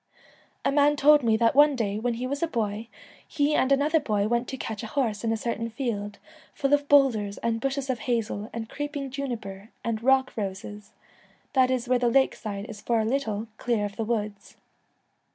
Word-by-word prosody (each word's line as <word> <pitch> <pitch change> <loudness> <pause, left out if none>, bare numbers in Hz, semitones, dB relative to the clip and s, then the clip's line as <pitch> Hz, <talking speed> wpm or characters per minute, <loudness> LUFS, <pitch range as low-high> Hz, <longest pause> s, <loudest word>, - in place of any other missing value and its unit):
A - - +3
man 290 +1 +4
told 295 +1 +6
me 225 -3 +2
that 230 0 +3
one 290 +1 +6
day, 210 -4 -1
when 240 +1 -1
he 245 +2 -4
was 280 +2 -3
a 335 - +2
boy, 220 -5 -2 0.4
he 290 0 +1
and 265 -2 +2
another 295 +4 +3
boy 210 -7 0
went 235 +2 0
to 265 - -5
catch 220 -3 -5
a 220 - -5
horse 220 -5 -1
in 225 - +1
a 225 - 0
certain 230 0 -3
field, 215 -4 -4 0.4
full 275 +1 0
of 290 0 +2
boulders 230 -8 +4
and 225 -1 0
bushes 275 +1 -2
of 255 -3 -1
hazel 225 -3 -2
and 230 -1 -5
creeping 290 0 -5
juniper 225 -7 -5
and 225 -2 -2
rock 265 +1 +3
roses, 205 0 -6 0.6
that 260 -2 +4
is 255 -1 -1
where 250 0 +3
the 240 -1 +2
lake 265 +3 +3
side 200 -2 -6
is 215 -4 -9
for 235 -1 +1
a 220 - +1
little 225 -4 -1
clear 230 -4 0
of 200 -1 -6
the 225 - -2
woods. 210 -3 -4
235 Hz, 205 wpm, -26 LUFS, 215-275 Hz, 0.6 s, told